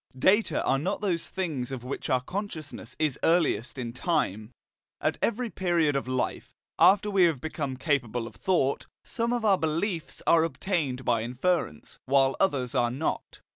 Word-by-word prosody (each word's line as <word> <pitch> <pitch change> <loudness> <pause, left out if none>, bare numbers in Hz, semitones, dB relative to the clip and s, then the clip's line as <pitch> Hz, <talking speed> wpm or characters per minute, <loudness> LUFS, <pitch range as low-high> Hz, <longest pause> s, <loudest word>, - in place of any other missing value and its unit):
Data 205 - +3
are 135 - +2
not 190 +8 -2
those 180 -5 -1
things 155 -10 -3
of 130 -3 -5
which 130 +2 -5
our 130 -1 +2
consciousness 170 -1 -6
is 150 -3 0
earliest 165 -7 +1
in 120 -2 -4
time. 110 - -1 0.5
At - - -1
every 235 0 0
period 170 -5 +1
of 140 - -1
life, 130 -1 -3 0.2
after 205 +2 +5
we 190 -3 +5
have 160 -6 +1
become 140 -2 -4
capable 125 -5 -1
of 115 - -9
thought, 165 -8 0 0.2
some 235 0 -1
of 240 -2 -1
our 195 -3 +4
beliefs 165 +2 -2
are 165 -1 +5
obtained 165 -7 -2
by 115 -2 +2
inference, 125 - -2
while 135 0 +3
others 135 -10 +1
are 120 -3 +2
not. 135 +6 -3
155 Hz, 165 wpm, -27 LUFS, 130-185 Hz, 0.5 s, after